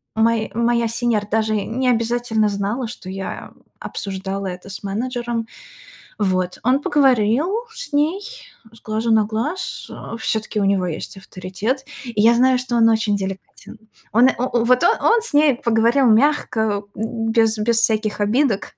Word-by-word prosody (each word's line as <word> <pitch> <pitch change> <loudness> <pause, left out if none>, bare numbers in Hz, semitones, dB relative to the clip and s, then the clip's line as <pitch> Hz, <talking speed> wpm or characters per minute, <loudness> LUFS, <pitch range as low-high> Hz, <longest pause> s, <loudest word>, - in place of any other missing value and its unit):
мой 225 0 +1
моя 235 0 +1
сеньор 230 -2 0
даже 220 0 +1
не 245 +5 -1
обязательно 230 -2 +1
знала, 205 +5 -2
что 200 -5 -9
я, 190 0 -6
э, - - -26 0.2
обсуждала 195 0 -4
это 180 +1 -7
с 190 - -8
менеджером. 235 +2 -3 0.7
Вот, 185 -3 -1
он 255 +4 +2
поговорил 270 - +2 0.2
с - - -7
ней 310 +7 +1 0.5
с 230 - -17
глазу 220 +2 -2
на 215 -1 +4
глаз, 230 - -4
э, 230 - -8
всё-таки 220 -1 -1
у 200 - +1
него 195 -2 +1
есть 165 +3 -6
авторитет, 195 +8 -4 0.2
и 230 -4 -3
я 230 +2 +6
знаю, 255 +1 +4
что 250 -1 -2
он 225 -1 +5
очень 215 -2 +1
деликатен. 195 +2 -7 0.3
Он, 240 +4 +5
о 245 - -1
о 240 -2 0
вот, 250 +7 +3
о - - +6
он 460 0 +4
с 470 - -3
ней 295 -2 +5
поговорил 235 +3 +2
мягко, 220 -4 +2
м, 225 +1 -3
без 225 -1 +3
без 230 +2 +2
всяких 215 -2 +1
обидок. 220 +1 +1
225 Hz, 165 wpm, -20 LUFS, 210-245 Hz, 0.7 s, я